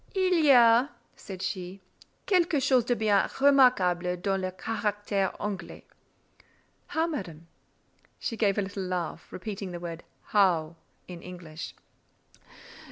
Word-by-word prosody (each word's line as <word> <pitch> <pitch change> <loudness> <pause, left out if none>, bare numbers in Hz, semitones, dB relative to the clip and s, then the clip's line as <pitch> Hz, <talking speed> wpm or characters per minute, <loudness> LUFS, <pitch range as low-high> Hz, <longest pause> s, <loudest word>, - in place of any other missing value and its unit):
"Il 375 -1 +2
y 295 - +4
a," 240 +1 +6 0.3
said 190 -2 -8
she, 185 0 -4 0.5
"quelquechose 295 - +2
de 245 - +2
bien 210 -3 +2
remarquable 190 -11 +4
dans 195 +1 -1
le 185 - -2
caractère 205 -1 -2
Anglais." 205 -2 -5 1.0
"How, 320 +1 0
Madame?" 180 - -6 0.7
She 230 - -4
gave 205 -3 +1
a 205 - +1
little 195 0 -5
laugh, 180 -3 -4
repeating 195 0 -6
the 175 -1 -6
word 170 -1 -7 0.2
"how" 170 -6 +2 0.3
in 175 -2 -9
English. 170 -3 -9
195 Hz, 120 wpm, -28 LUFS, 180-235 Hz, 1.0 s, a